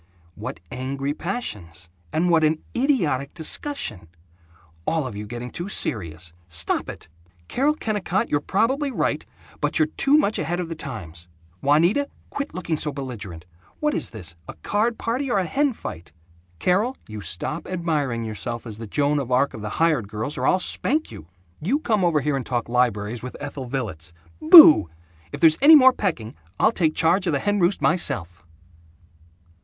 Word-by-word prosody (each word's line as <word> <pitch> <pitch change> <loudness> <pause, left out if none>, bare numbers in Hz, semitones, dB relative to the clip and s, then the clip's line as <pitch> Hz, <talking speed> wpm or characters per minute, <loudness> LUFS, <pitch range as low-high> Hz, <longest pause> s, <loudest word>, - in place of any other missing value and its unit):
What - - -7
angry 135 +3 -3
passions 105 - -6 0.2
and 175 +2 +1
what 165 -2 +4
an 155 0 +1
idiotic 175 - 0
discussion! 160 - -4 0.8
All 160 -3 +1
of 125 -5 -6
you 105 +1 -6
getting 120 +2 -6
too 175 +3 -5
serious. 85 - -3
Stop 85 0 0
it! - - -9 0.4
Carol 290 +4 +1
Kennicott, 210 - -1
you're 145 - +1
probably 265 - 0
right, 265 - -1 0.4
but - - 0
you're 315 -1 +2
too 280 +2 +4
much 220 -8 +1
ahead 175 +2 -2
of 175 -2 -4
the 165 - -4
times. 90 - -8 0.3
Juanita, 170 - +3 0.2
quit 280 0 -5
looking 170 -3 -2
so 150 0 -2
belligerent. 110 - -7 0.3
What 300 -1 +1
is - - -2
this, 90 -8 -8
a - - -8
card 225 +3 0
party 255 +4 -2
or 240 - +1
a 190 - +1
hen 285 - +1
fight? 85 - -8 0.5
Carol, 205 - +1
you 110 -1 -7
stop 150 - -3
admiring 150 -10 -1
yourself 115 +2 -4
as 110 -2 -8
the 115 - -7
Joan 145 +6 +1
of 130 -3 -5
Arc 130 +3 +2
of 110 - -8
the 105 - -4
hired 155 -6 +1
girls, 110 +7 -4
or - - -1
I'll 185 - +4
spank 295 - -1
you. 75 - -11 0.3
You 215 - +1
come 220 -10 0
over 165 -4 +2
here 145 +1 0
and 135 - -2
talk 120 -1 -2
libraries 120 -2 0
with 125 - -7
Ethel 140 -2 -6
Villets. 90 - -4 0.3
Boooooo! 315 - +10 0.4
If - - -7
there's 160 -1 +6
any 310 +3 +9
more 260 -3 +7
pecking, 140 - -3 0.3
I'll 220 - +4
take 165 -8 0
charge 180 +4 +2
of 165 - +1
the - - +2
hen 205 +4 0
roost 180 +2 +1
myself!" 90 - 0
150 Hz, 175 wpm, -23 LUFS, -, 0.8 s, Boooooo